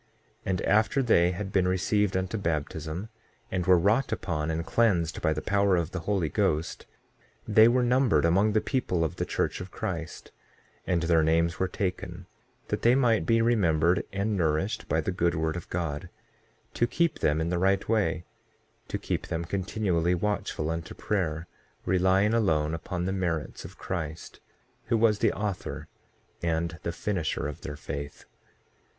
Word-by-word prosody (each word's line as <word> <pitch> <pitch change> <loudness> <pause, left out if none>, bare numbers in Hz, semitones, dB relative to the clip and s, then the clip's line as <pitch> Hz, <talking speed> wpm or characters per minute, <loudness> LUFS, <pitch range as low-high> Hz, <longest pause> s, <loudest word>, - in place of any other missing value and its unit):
6:4 - - -38 0.4
And 95 -1 0
after 110 +6 +3
they 90 -8 +4
had 95 +2 -4
been 95 -2 +3
received 95 +2 +1
unto 95 +3 -2
baptism, 80 +1 -3 0.4
and 90 -2 -1
were 90 -1 +7
wrought 105 +10 +2
upon 75 -4 -2
and 80 +1 -2
cleansed 90 -9 +1
by 80 - +2
the 75 0 -2
power 100 -1 +3
of 85 -3 -1
the 95 - -3
Holy 95 -6 +1
Ghost, 75 +2 -1 0.6
they 110 +1 +7
were 125 +1 +3
numbered 120 - +3
among 100 +6 +3
the 110 - +3
people 105 -11 0
of 80 +2 -3
the - - -2
church - - -1
of 90 - -7
Christ; 85 -2 -5 0.6
and 85 -3 +1
their 85 -1 +4
names 85 +2 +2
were 95 - +1
taken, 90 -1 -4 0.4
that - - -1
they 120 +2 +5
might 115 -10 +2
be 115 0 +4
remembered 90 -7 +3
and 100 +2 -1
nourished 90 +5 -1
by 80 - +2
the 85 - -2
good 85 -2 +1
word 80 0 -1
of 85 - -7
God, 80 -4 -3 0.6
to 120 - +1
keep 170 +6 0
them 75 +1 +2
in 80 +1 -1
the 90 0 0
right 95 +1 +2
way, 85 -7 +1 0.6
to - - -2
keep - - -3
them 85 +1 -3
continually 90 -2 0
watchful 90 -5 -2
unto 80 0 -5
prayer, 85 -6 -2 0.4
relying 95 +3 +3
alone 80 -9 +2
upon 90 +2 -3
the 95 - -1
merits 85 -5 -2
of - - -11
Christ, 80 -4 -5 0.5
who 115 - +1
was 110 -2 +3
the - - +3
author 105 -3 -4 0.5
and 85 0 -1
the 85 - -2
finisher 85 -4 -2
of 75 - -7
their 75 -1 -6
faith. 70 0 -7
90 Hz, 170 wpm, -28 LUFS, 80-105 Hz, 0.6 s, were